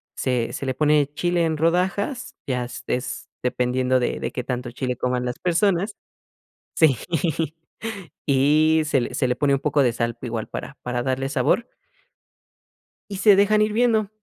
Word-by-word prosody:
se 125 -3 -1
se - - -5
le 130 - 0
pone 150 0 +2
chile 175 +1 +1
en 160 -1 -1
rodajas, 185 - 0
ya 125 -2 -1
s 120 - -8
es 125 +1 -3
dependiendo 125 +1 +1
de 120 - -1
de - - -3
qué 125 - -4
tanto 125 -1 -4
chile 125 0 -3
coman 125 0 -1
las 125 +1 -3
personas, 190 +3 +1 0.8
sí, 155 -6 +4 1.3
y 155 +3 +4
se 140 -4 +2
le - - -4
se 130 - +1
le 125 - 0
pone 140 0 +2
un 135 - +2
poco 150 -1 +2
de 120 -3 +2
sal 115 0 -2
igual 115 -2 -3
para - - -7
para 125 0 -2
darle 135 +1 -1
sabor 140 - +1 1.4
y 200 - -4
se 205 0 +6
dejan 205 +2 +4
hirviendo. 220 -1 +2
140 Hz, 165 wpm, -23 LUFS, 125-175 Hz, 1.4 s, se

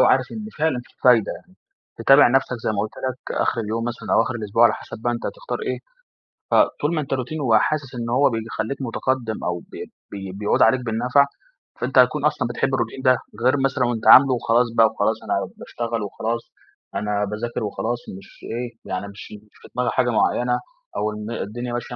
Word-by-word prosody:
وعارف - - +4
إن 215 -1 -6
فعلًا 155 -4 +1
فيه - - -24
فايدة 120 -4 +5
يعني. 185 - -13 0.4
تتابع 135 +1 +7
نفْسك 130 +1 +1
زي - - +1
ما 105 - -2
قُلت 110 - -3 0.2
لك 130 0 -6
آخر 115 - 0
اليوم 110 +1 -2
مثلًا 120 0 -3
أو - - +6
آخر 130 - -2
الأسبوع، 110 0 +1
على - - +4
حَسب - - -8
بقى 120 - +1
أنت 120 - -5
هتختار - - -5
إيه. - - -2 0.7
فطول 150 +4 +2
ما 155 - 0
أنت 140 - -4
روتين 135 +4 -3
وحاسس 135 +2 +1
إن 120 -1 -4
هو 130 +4 +4
بيخلّيك 115 +2 -3
متقدّم 120 -2 -2
أو 90 0 -1
ب - - -20 0.4
بي 95 -2 -6
بيعود 105 +2 0
عليك 125 +3 +5
بالنفع، 125 +5 +3 0.5
فأنت 130 +2 -1
هتكون 140 +4 +5
أصلًا 145 -5 +1
بتحب 135 +3 -1
الروتين 120 0 -2
ده. 130 -2 +4 0.3
غير 130 - +5
مثلًا 135 -1 +1
وأنت 120 -2 -2
عاملُه 135 0 +9
وخلاص 120 0 +2
بقى 115 -1 +7
وخلاص، - - 0
أنا - - 0 0.2
باشتغل 115 -1 -4
وخلاص، 115 +3 -3 0.5
أنا 105 0 0
باذاكر 110 +4 -4
وخلاص 115 +3 -2 0.2
مش 95 - -16
إيه، 120 +1 -4
يعني 95 +2 -4
مش 100 +1 -11
مش 105 0 -14
في - - -13
دماغي 125 0 +1
حاجة 125 -1 +1
معيّنة، 125 +2 +1 0.4
أو - - -1
إن 105 +1 -6
الدنيا 120 +2 -4
ماشية 120 0 -4
120 Hz, 195 wpm, -22 LUFS, 110-130 Hz, 0.7 s, عاملُه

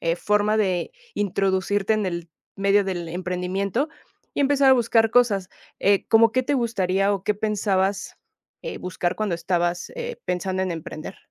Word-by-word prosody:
eh, 165 0 0
forma 210 +3 +1
de 190 - 0 0.2
introducirte 195 +1 0
en 215 -2 0
el 170 -2 -4 0.3
medio 200 +1 +3
del 175 -3 -3
emprendimiento 185 - -2 0.5
y - - +1
empezar 280 -1 +4
a - - +9
buscar 225 -2 +3
cosas. 210 -7 +3 0.3
Eh, 200 0 +3
como, 225 0 +5
¿qué 255 - +2
te 285 - 0
gustaría 200 -5 +1
o 195 - -2
qué 210 - +1
pensabas, 200 -2 -1 0.5
eh, - - -5
buscar 180 -1 -2
cuando 215 -5 -1
estabas, 175 0 -1
eh, 485 0 -5
pensando 185 +1 -1
en 185 - -1
emprender? 160 +2 -7
195 Hz, 160 wpm, -24 LUFS, 180-220 Hz, 0.5 s, a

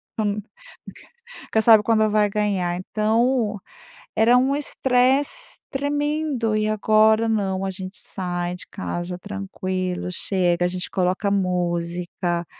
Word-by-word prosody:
Tu 220 - -1 1.1
nunca 225 - -2
sabe 220 -2 +7
quando 220 0 +3
vai 210 -1 +3
ganhar. 195 -4 0
Então, 220 +3 0 0.5
era 230 +3 +5
um 260 +2 +2
estresse 275 - +1
tremendo. 290 -4 -1
E 215 0 +1
agora, 215 +1 +3
não, 195 -3 0
a 195 - -1
gente 190 +1 -8
sai 175 -2 -4
de 180 - -11
casa 180 -2 -5
tranquilo, 185 -2 -4
chega, 175 -1 0
a - - +3
gente 180 0 -5
coloca 185 +2 0
música. 175 -2 -1
205 Hz, 120 wpm, -23 LUFS, 180-230 Hz, 1.1 s, sabe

